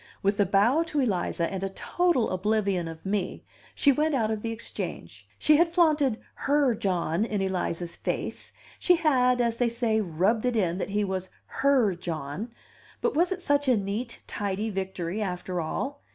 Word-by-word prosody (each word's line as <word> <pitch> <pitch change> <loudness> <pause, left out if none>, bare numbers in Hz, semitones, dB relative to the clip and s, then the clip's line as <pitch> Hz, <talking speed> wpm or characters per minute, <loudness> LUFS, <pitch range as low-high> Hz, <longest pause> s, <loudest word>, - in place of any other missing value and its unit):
With 200 +1 +1
a 200 - +4
bow 210 - +4
to 300 - -1
Eliza, 185 -8 0
and 190 0 -3
a 195 - -1
total 340 - +1
oblivion 195 -2 0
of 160 +1 -9
me, 195 -1 -2 0.3
she 280 - +5
went 300 +2 +1
out 220 -4 +1
of 215 -1 -2
the 230 - -3
Exchange. 225 0 -6
She 305 -1 +5
had 335 +1 +4
flaunted 305 -8 +3 0.3
"her" 285 -3 +4
John 180 -3 0
in 215 -2 -1
Eliza's 180 -3 -2
face, - - -4 0.3
she 355 - +5
had, 255 -6 +3
as 235 -1 +1
they 245 -1 +2
say, 230 -2 0
rubbed 200 +6 +1
it 245 - 0
in 180 -4 +1
that 195 - -3
he 205 +1 0
was 190 -1 -3 0.2
"her" 265 -8 +2
John; 170 - -5 0.5
but 470 - 0
was 345 +4 +2
it 370 -1 -3
such 285 -2 +2
a 250 -3 +4
neat, 210 +5 -4
tidy 205 +2 -3
victory, 190 0 -3
after 180 -2 -3
all? 270 - -3
215 Hz, 180 wpm, -27 LUFS, 190-260 Hz, 0.5 s, she